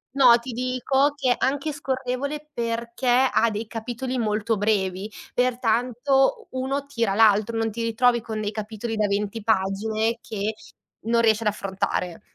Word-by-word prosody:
No, 245 -3 +7
ti 245 +2 -7
dico 255 +3 +1
che 255 -3 +2
anche 280 +3 -1
scorrevole 275 +2 -3
perché 235 +2 -3
ha 245 -2 +4
dei 215 +1 -4
capitoli 240 +3 -4
molto 215 0 0
brevi, 200 -1 0 0.2
pertanto 250 +2 +1
u 260 - -4
uno 275 +1 -2
tira 230 -8 -1
l'altro, 220 +1 +4
non 225 -1 0
ti 230 +2 -5
ritrovi 235 +1 +2
con 220 -1 -5
dei 210 0 -2
capitoli 220 +1 -5
da 210 -1 +1
20 205 +2 -2
pagine 220 +3 0
che 215 +1 -3 0.5
non 230 0 +2
riesci 220 -1 +3
ad 210 - +2
affrontare. 190 -3 -3
230 Hz, 150 wpm, -24 LUFS, 215-255 Hz, 0.5 s, No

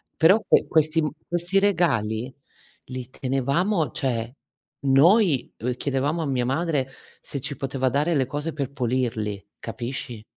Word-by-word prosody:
però 190 +7 +5
que - - +4
questi 155 0 +2
m 150 - 0 0.2
questi 175 +3 0
regali 135 - +1 0.6
li 130 -1 -6
tenevamo, 140 - 0
cioè 120 -3 -2 0.5
noi 155 - +4
v 125 +2 -2
chiedevamo 140 +5 -1
a 155 - -2
mia 125 -2 0
madre 145 -1 0 0.3
se 140 - -5
ci 140 0 -4
poteva 135 -1 -1
dare 150 +6 +1
le 135 -4 +1
cose 150 +3 -3
per 140 -2 -3
pulirli, 115 -6 -2
capisci? 120 -1 -5
135 Hz, 140 wpm, -24 LUFS, 125-160 Hz, 0.6 s, però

